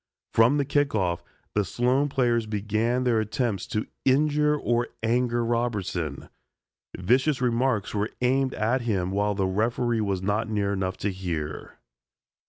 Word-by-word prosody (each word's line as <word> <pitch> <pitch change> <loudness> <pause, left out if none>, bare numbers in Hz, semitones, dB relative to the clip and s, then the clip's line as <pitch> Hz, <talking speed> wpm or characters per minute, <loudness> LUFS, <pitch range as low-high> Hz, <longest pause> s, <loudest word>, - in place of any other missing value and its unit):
From 115 +6 +5
the 140 - +1
kick 145 -2 +1
off, 90 -4 0 0.3
the 105 - +2
Sloan 125 +8 +1
players 120 -4 +1
began 110 +4 0
their 120 -3 +2
attempts 110 -2 -2
to 105 - -2 0.2
injure 150 +2 +3
or 120 -3 0 0.2
anger 120 +1 +1
Robertson. 100 - -2 0.7
Vicious 125 - +2
remarks 125 -3 0
were 105 +1 -1
aimed 130 +2 +1
at 115 +5 +1
him 95 -6 -1
while 100 +1 0
the 95 -1 0
referee 115 +4 0
was 100 -3 -1
not 105 +3 0
near 100 -2 0
enough 95 -1 -2
to 100 - -1
hear. 85 -5 -5
115 Hz, 145 wpm, -26 LUFS, 100-125 Hz, 0.7 s, From